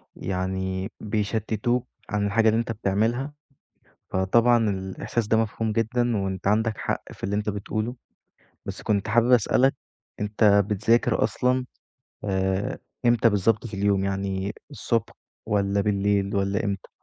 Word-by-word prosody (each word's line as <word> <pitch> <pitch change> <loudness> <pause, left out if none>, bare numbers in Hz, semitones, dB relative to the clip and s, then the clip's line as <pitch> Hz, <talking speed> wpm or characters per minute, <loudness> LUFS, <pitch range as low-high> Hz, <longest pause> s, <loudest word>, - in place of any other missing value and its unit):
يعني 95 +1 -3
بيشتتوك 110 +3 -1 0.2
عن 105 0 0
الحاجة 110 +2 +3
اللي 110 +1 +2
أنت 115 0 -2
بتعملها، 115 +6 0 0.8
فطبعًا 115 +4 +3
الإحساس 95 +4 -3
ده 110 - +4
مفهوم 110 0 0
جدًا 115 +1 +1
وأنت 95 -2 -3
عندك 110 +1 +1
حق - - -2
في - - -9
اللي 100 +1 -1
أنت 105 0 -2
بتقوله. 110 +4 -3 0.7
بس - - -6
كنت 105 0 0
حابب 120 +2 +3
أسألك 125 +3 +4 0.5
أنت 105 -1 +4
بتذاكر 110 +4 +2
أصلًا 125 0 +1 0.6
آآ، 95 0 -1 0.3
إمتى 120 0 +5
بالضبط 105 +3 +1
في 110 - -8
اليوم 100 0 +1
يعني 95 0 -2 0.2
الصبح - - -1 0.3
والّا 100 -1 +1
بالليل 100 0 +1
والّا 100 0 0
إمتى؟ 100 -2 -3
105 Hz, 130 wpm, -25 LUFS, 100-115 Hz, 0.8 s, إمتى